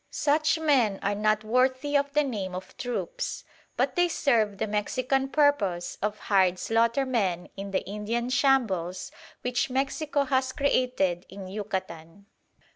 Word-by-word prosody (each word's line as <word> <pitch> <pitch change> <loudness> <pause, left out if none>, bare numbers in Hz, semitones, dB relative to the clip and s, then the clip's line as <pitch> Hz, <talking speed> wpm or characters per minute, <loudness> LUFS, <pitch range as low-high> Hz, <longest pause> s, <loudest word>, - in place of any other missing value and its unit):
Such 310 +2 +2
men 265 -11 +2
are 200 - +1
not 215 +1 +1
worthy 260 +5 +1
of 280 0 +2
the 300 0 +3
name 200 -9 -3
of 185 - -8
troops; 480 - -4 0.3
but - - +1
they 355 -1 +4
serve 225 - +1
the - - -1
Mexican 255 +6 0
purpose 220 - +1
of 210 +1 -1
hired 190 -4 +2
slaughtermen 230 -5 0
in 200 0 -6
the 195 - -1
Indian 225 +5 -3
shambles 220 -10 +1 0.3
which 250 +1 0
Mexico 280 +3 0
has 260 -1 0
created 250 -10 0
in 190 0 -8
Yucatan. 190 -3 -6
230 Hz, 135 wpm, -27 LUFS, 195-270 Hz, 0.3 s, they